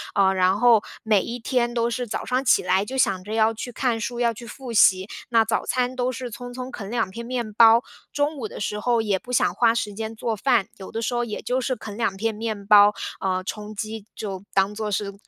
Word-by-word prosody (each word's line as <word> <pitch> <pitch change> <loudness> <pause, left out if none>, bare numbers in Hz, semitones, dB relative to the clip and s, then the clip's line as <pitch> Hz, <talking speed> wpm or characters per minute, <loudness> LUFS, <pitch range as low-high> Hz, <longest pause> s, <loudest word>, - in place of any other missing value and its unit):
呃， 195 -1 +4
然 185 +1 +3
后 235 -3 +6 0.2
每 215 -3 +3
一 235 - -5
天 240 +1 0
都 235 0 +1
是 245 +1 -3
早 210 - -4
上 255 +1 0
起 - - +4
来， 190 +2 +2
就 265 +5 -5
想 190 -7 +1
着 215 - -5
要 220 0 +3
去 235 +2 -6
看 240 -3 0
书， 240 +2 -4
要 235 -1 +2
去 240 +2 -10
复 255 +1 -8
习。 190 -3 +5 0.2
那 230 -2 +4
早 225 - -1
餐 250 0 0
都 250 0 0
是 255 0 -6
匆 245 +2 -8
匆 255 +1 -6
啃 200 -7 -7
两 230 -4 -1
片 235 +5 -7
面 240 -3 -3
包， 230 +2 +6 0.3
中 290 +1 0
午 235 -5 -4
的 - - -9
时 210 +1 -2
候 235 +1 +1
也 205 -3 0
不 250 - -11
想 - - +2
花 230 -2 +4
时 210 -3 -2
间 220 +2 -5
做 225 0 -2
饭， 225 -2 +2
有 190 - -9
的 225 - -3
时 230 - -2
候 240 0 0
也 215 - -5
就 250 +1 -1
是 260 0 -1
啃 215 -3 -9
两 225 -5 0
片 220 +3 -1
面 215 -2 -4
包， 205 0 +7 0.3
呃， 185 -1 -1
充 210 +2 -6
饥， 215 0 -5
就 195 -3 -5
当 195 +1 +2
做 215 0 -3
是 200 0 -2
225 Hz, 265 characters per minute, -24 LUFS, 205-245 Hz, 0.3 s, 包